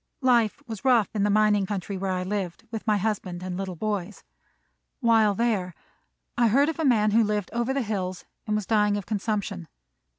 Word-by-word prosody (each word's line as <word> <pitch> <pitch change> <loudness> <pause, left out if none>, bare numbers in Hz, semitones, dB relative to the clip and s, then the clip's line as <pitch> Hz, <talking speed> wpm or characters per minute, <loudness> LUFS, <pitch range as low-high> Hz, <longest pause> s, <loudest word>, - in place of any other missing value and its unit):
Life 240 +1 +2
was 220 -5 -7
rough 245 -6 +4
in 210 - -1
the 205 - +2
mining 210 -1 +3
country 200 0 -4
where 190 0 -3
I 180 0 -2
lived, 190 0 -4
with 225 0 -6
my 210 -1 +3
husband 190 -4 -3
and 185 -1 -4
little 190 -1 -4
boys. 205 +1 -3 0.8
While 225 -5 +4
there 200 -6 0 0.6
I 240 -1 +3
heard 275 +7 +3
of 325 - -5
a - - 0
man 220 -6 +3
who 225 +2 +4
lived 210 -2 -2
over 235 +2 0
the 270 -1 0
hills 185 -4 -3 0.2
and 210 - 0
was 210 -2 -1
dying 210 -1 +2
of 200 - -5
consumption. 205 -4 -3
210 Hz, 195 wpm, -26 LUFS, 195-225 Hz, 0.8 s, rough